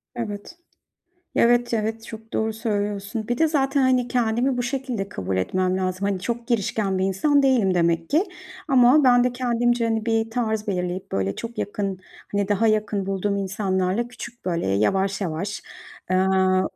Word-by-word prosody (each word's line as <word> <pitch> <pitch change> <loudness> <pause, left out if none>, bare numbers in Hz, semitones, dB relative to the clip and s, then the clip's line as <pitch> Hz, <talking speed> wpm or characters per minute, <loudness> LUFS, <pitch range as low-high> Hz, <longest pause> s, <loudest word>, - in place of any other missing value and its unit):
Evet. 225 - -6 0.8
Evet, 240 0 +3
evet, 220 +1 -2
çok 225 0 -10
doğru 220 0 0
söylüyorsun. 210 -1 -3
Bir 240 0 -1
de 320 - +4
zaten, 275 -2 +1
hani, 255 -1 +2
kendimi 245 +2 +1
bu 245 - 0
şekilde 245 -5 -3
kabul 95 - -3
etmem 185 - 0
lazım. 185 +1 -1
Hani, 195 -2 -1
çok 235 +3 -3
girişken 205 -4 0
bir 190 - +1
insan 280 +10 +2
değilim 240 -9 +3
demek 170 -1 +1
ki 325 +6 +3 0.4
ama 265 +2 +6
ben 245 -1 +5
de 250 - +1
kendimce, 240 -1 +1
hani, 225 0 -1
bir 225 0 +1
tarz 220 -2 -1
belirleyip 180 -1 -3
böyle 95 0 -1
çok 235 +1 -7
yakın, 200 -2 -2 0.3
hani, 200 -1 0
daha 210 +2 +2
yakın 215 -2 0
bulduğum 195 +1 -1
insanlarla 195 +2 -1
küçük 240 -1 -10
böyle 170 -2 -1
yavaş 190 - +1
yavaş, 190 +3 -3 0.5
aaa, 185 0 +3
215 Hz, 160 wpm, -23 LUFS, 190-240 Hz, 0.8 s, ama